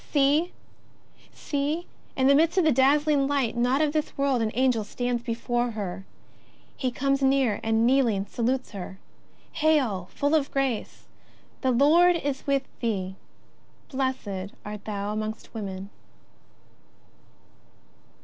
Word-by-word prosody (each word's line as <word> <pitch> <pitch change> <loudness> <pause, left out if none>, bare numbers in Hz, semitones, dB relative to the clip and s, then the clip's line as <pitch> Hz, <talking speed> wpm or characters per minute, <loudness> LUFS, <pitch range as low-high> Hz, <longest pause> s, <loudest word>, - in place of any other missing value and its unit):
See! 295 +5 +3 0.8
See! 295 +4 -2 0.3
in 260 - +1
the 275 - +6
midst 325 +5 +3
of 365 - +4
a 310 - +5
dazzling 280 +2 +3
light, 275 -5 0
not 250 +4 +2
of 300 -1 0
this 310 -1 -2
world, 275 -3 +1
an 220 - +1
Angel 250 -3 +2
stands 245 +3 -2
before 240 +1 -1
her. 195 -4 -5 0.7
He 260 - -1
comes 275 +2 0
near, 265 -5 +2
and, 225 +1 +2
kneeling, 240 -6 +2
salutes 250 +5 -2
her: 190 -2 -7 0.3
" - - -33
Hail, 255 - +2
full 285 +2 0
of 295 -3 +2
grace, 270 -5 -2 0.5
the 260 - +1
Lord 315 +8 +5
is 285 -5 -3
with 275 -1 +2 0.2
thee: 190 -5 -2 0.7
blessed 255 -8 -3
art 210 0 -7
thou 205 -1 -3
amongst 215 +1 -5
women 195 -3 -6
260 Hz, 130 wpm, -26 LUFS, 220-280 Hz, 0.8 s, the